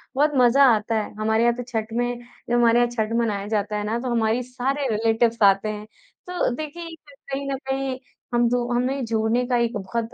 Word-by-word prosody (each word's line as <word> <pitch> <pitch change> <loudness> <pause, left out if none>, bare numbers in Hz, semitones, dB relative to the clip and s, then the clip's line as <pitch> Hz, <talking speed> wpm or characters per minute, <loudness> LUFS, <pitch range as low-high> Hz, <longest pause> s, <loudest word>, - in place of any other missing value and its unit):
बहुत 295 +3 +3
मज़ा 250 +2 +5
आता 215 +2 -2
है 215 -1 -2
हमारे 220 +1 +2
यहाँ 235 0 +3
तो 245 - -5
छठ 220 -1 -3
में 245 0 -1 0.3
जब - - 0
हमारे 240 0 +4
यहाँ 240 0 +3
छठ 220 -2 -2
मनाया 205 -4 -1
जाता 210 -1 -1
है 210 - -2
ना, 215 +2 -1
तो 255 +1 -4
हमारी 230 +1 +1
सारे 265 +3 -2
रिलेटिव्स 225 +1 +1
आते 195 +1 +4
हैं। 210 0 -5 0.4
तो 360 0 0
देखिए, 330 +3 -7 0.4
कहीं 275 +1 -3
न 270 - -1
कहीं 265 -1 -2 0.3
हम 240 0 +3
दो 245 0 0
हमें 255 +3 0
जोड़ने 225 +2 0
का 245 -1 +1
एक 230 -1 -3
बहुत 230 +4 -4
235 Hz, 205 wpm, -23 LUFS, 220-255 Hz, 0.4 s, मज़ा